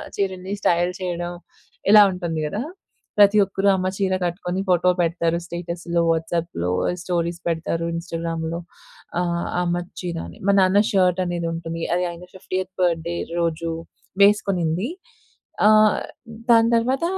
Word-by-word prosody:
చీరల్ని 190 0 -2
style 175 0 +2
చేయడం 175 -1 -3 0.6
ఇలా 210 0 +10
ఉంటుంది 170 -3 -3
కదా! 205 +8 -3 0.6
ప్రతి 205 +1 +7
ఒక్కరు 195 +1 -1
అమ్మ 185 0 -1
చీర 190 -2 0
కట్టుకొని 180 +1 -2
ఫోటో 180 0 +4
పెడతారు. 170 0 0
స్టేటస్‌లో, 170 0 -3
వాట్సాప్‌లో 165 - -2 0.3
స్టోరీస్ 170 -1 -1
పెడతారు 165 0 -1
ఇన్‌స్టాగ్రామ్‌లో 165 -1 -3 0.6
ఆహ్, 170 -1 -1 0.2
అమ్మ 175 0 0 0.2
చీర 175 -2 -4
అని. - - -13
మా 200 - +5
నాన్న 190 +2 +4
షర్ట్ 185 -2 +3
అనేది 175 -1 -2
ఉంటుంది. 165 0 -5
అది 180 - 0
ఆయన 170 +1 -10
50 185 0 -4
బర్త్‌డె 170 -1 0 0.2
రోజు 165 0 -1 0.5
వేసుకునింది. 195 - +2 0.8
ఆహ్, 215 0 +6 0.5
దాని 230 0 +6
తరువాత 255 +5 +1
175 Hz, 125 wpm, -22 LUFS, 170-190 Hz, 0.8 s, ఇలా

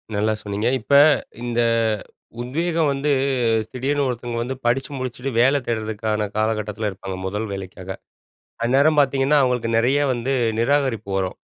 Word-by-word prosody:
நல்லா 105 +2 +1
சொன்னீங்க. 105 +2 -2
இப்ப 115 - -12 0.5
இந்த 120 -1 0 0.8
உத்வேகம் 160 +5 0
வந்து 140 +2 -1 0.6
திடீர்னு 140 +3 -1
ஒருத்தவங்க 120 -1 -4
வந்து 125 +3 -3
படிச்சு 125 +2 +1
முடிச்சுட்டு 130 +1 -4
வேலை 135 +4 +5
தேடுறதுக்கான 110 -2 -2
காலகட்டத்துல 110 -1 -1
இருப்பாங்க 95 0 -7
முதல் 105 +4 -3
வேலைக்காக, 95 -1 -7 0.7
அந்நேரம் 140 +6 +3
பாத்தீங்கன்னா 140 +1 +3
அவுங்களுக்கு 125 -3 0
நெறைய 125 +5 +3
வந்து 125 +3 -2 0.3
நிராகரிப்பு 125 -5 +1
வரும். 95 -1 -2
120 Hz, 125 wpm, -22 LUFS, 110-135 Hz, 0.8 s, வேலை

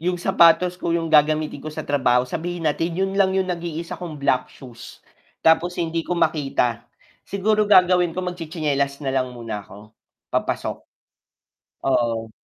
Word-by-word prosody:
yung 180 +2 -1
sapatos 180 0 +4
ko 170 - -1
yung 165 -1 -3
gagamitin 155 -1 +3
ko 155 - -7
sa 155 0 -6
trabaho, 125 -3 +2
sabihin 170 +6 -5
natin 165 +2 0
yun 195 +1 0
lang 190 -1 +3
yung 190 -1 0
nag-iisa 170 -1 -5
kong 170 -4 -6
black 140 -2 0
shoes 125 -3 -13 0.4
tapos 170 +2 +3
hindi 165 -1 -1
ko 180 - -1
makita, 125 -7 0 0.4
siguro 210 +1 +1
gagawin 180 -3 +4
ko 185 - -2
magtsi-tsinelas 155 -5 -2
nalang 130 -1 0
muna 115 -3 -5
ako, 105 +2 -15 0.4
papasok. - - -1 1.1
Oo. 115 -4 0
160 Hz, 145 wpm, -22 LUFS, 135-175 Hz, 1.1 s, sapatos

